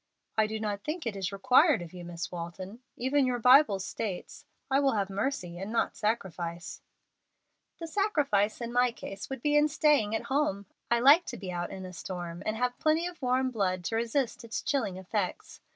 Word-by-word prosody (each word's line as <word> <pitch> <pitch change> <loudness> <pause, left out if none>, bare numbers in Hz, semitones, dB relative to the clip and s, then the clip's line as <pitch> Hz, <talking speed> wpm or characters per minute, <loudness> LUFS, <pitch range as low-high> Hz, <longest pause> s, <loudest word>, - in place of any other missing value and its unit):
"I 220 -1 +3
do 220 0 -4
not 205 -2 -3
think 315 0 -4
it 225 -3 -2
is 195 0 -3
required 255 - +4
of 170 - -11
you, 180 -1 -8
Miss 170 -1 -6
Walton. 180 +5 -7 0.2
Even 265 +2 +2
your 250 -1 0
Bible 250 -2 +6
states, 190 0 -5 0.3
'I 270 - +4
will 275 -1 +3
have 200 -2 -1
mercy 195 -5 -2
and 195 +3 -5
not 230 - 0
sacrifice.'" 175 -6 -3 1.0
"The 335 - -6
'sacrifice' 295 - +1
in 235 0 -4
my 245 0 +3
case 195 -4 -8
would 270 -3 -6
be 295 0 +2
in 295 0 +5
staying 300 -8 +2
at 225 - -2
home. 265 -8 0 0.2
I 235 0 +3
like 295 +7 +7
to - - -6
be 190 -2 -6
out 175 0 -3
in 190 -1 -7
a 180 - -8
storm, 175 -1 -6
and 215 +1 -1
have 245 +1 -1
plenty 315 +2 +2
of 350 -2 -7
warm 255 0 +1
blood 185 -5 -1
to 200 - -2
resist 235 +2 -1
its 230 -1 -4
chilling 225 -10 -1
effects. 190 0 -4
220 Hz, 200 wpm, -29 LUFS, 190-270 Hz, 1.0 s, like